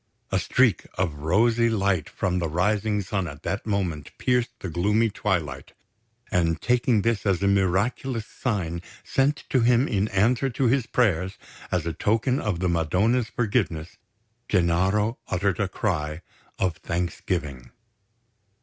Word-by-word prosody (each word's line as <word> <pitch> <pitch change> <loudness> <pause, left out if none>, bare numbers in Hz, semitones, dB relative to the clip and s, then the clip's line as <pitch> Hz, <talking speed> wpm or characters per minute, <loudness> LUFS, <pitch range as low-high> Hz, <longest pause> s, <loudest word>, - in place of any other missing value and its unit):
A - - +2
streak - - +2
of 90 -4 0
rosy 115 +9 +3
light 100 -6 0
from 90 -1 -1
the 85 -2 -1
rising 105 +5 +1
sun 95 -1 -2
at 75 +1 -9
that 100 +6 -3
moment 90 -8 -2
pierced 125 -1 +1
the - - -5
gloomy 105 +7 +1
twilight; 80 -11 -2 0.6
and 85 -2 +1
taking 120 -3 +2
this 115 -3 +1
as 95 -3 +1
a - - +3
miraculous 100 +5 +1
sign 90 -11 -3 0.2
sent 140 +2 +1
to 130 - +4
him 120 +2 +4
in 100 0 0
answer 115 +7 +2
to 130 +2 -2
his 125 0 +2
prayers 95 -5 +1 0.3
as 90 -3 0
a 85 - -2
token 115 - +1
of 95 -5 -2
the 90 - +1
Madonna's 95 +9 +1
forgiveness, 100 -8 -1 0.5
Gennaro 95 +5 +2
uttered 95 0 0
a 100 - +1
cry 80 -5 -2 0.3
of 90 -4 0
thanksgiving. 85 -5 -3
100 Hz, 140 wpm, -25 LUFS, 85-115 Hz, 0.6 s, to